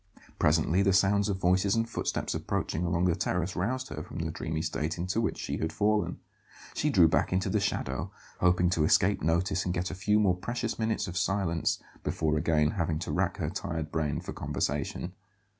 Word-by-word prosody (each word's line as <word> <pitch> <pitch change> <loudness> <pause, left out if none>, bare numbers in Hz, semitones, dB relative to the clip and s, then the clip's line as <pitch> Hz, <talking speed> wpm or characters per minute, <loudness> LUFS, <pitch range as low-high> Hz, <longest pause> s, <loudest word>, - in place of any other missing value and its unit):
Presently 80 +4 +3
the 100 -1 +3
sounds 100 +2 +3
of 100 - 0
voices 95 +2 +2
and 115 0 +1
footsteps 115 - -2
approaching 80 - -2
along 85 0 +1
the 90 - +3
terrace 90 +1 -1
roused 130 +8 -2
her - - -5
from - - -9
the 80 -1 -2
dreamy 80 0 -3
state 75 +5 -2
into 90 +6 -1
which 115 - -1
she - - -3
had 80 - -2
fallen. 105 0 +1 0.6
She 150 - 0
drew 90 - +6
back 80 - +1
into 95 +1 0
the - - +2
shadow, - - -2 0.3
hoping 90 0 +3
to 80 -3 +2
escape 95 +6 +3
notice 90 +4 +1
and 90 0 -2
get 90 +1 -2
a - - -5
few 105 +3 +2
more 95 -4 +3
precious 120 +5 -3
minutes 110 -1 0
of 90 0 -5
silence 95 -5 0 0.2
before 75 -1 0
again 75 -1 +2
having 85 -4 -1
to 80 - -4
rack - - 0
her - - -2
tired 80 -2 -4
brain 75 -3 -1
for - - -6
conversation. 75 +5 -2
90 Hz, 195 wpm, -29 LUFS, 80-100 Hz, 0.6 s, drew